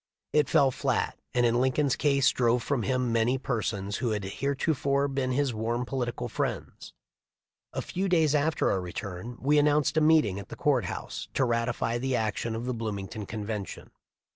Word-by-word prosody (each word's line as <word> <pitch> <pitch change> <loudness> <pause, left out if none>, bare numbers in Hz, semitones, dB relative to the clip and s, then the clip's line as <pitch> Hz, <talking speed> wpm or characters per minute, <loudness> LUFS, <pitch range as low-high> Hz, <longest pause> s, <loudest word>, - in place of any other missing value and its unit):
It 150 -3 +3
fell 135 -1 +4
flat, - - -1 0.2
and 120 0 +4
in 120 +1 +3
Lincoln's 130 +1 +2
case 140 -3 +3
drove 120 -1 +2
from 140 -4 0
him 125 0 0
many 115 +3 +2
per 125 -3 -2
sons 100 -2 -2
who 120 - -1
had 105 -2 -1
heretofore 140 - 0
been 135 -2 -1
his 135 -1 +1
warm 115 +3 -1
political 125 -3 -3
friends. - - -4 0.8
A - - -3
few 190 +2 -2
days 160 -5 +3
after 155 +1 +2
our 95 - 0
return 95 +5 -6
we 145 +3 +3
announced 150 +1 +2
a - - +5
meeting 150 -11 +4
at 100 - -10
the - - -7
court - - +2
house - - -5
to 135 - +3
ratify 115 0 0
the 130 +1 0
action 110 0 -1
of 115 +2 -4
the 125 - -1
Bloomington 105 -2 -5
convention. 105 -2 -5
125 Hz, 180 wpm, -28 LUFS, 110-140 Hz, 0.8 s, a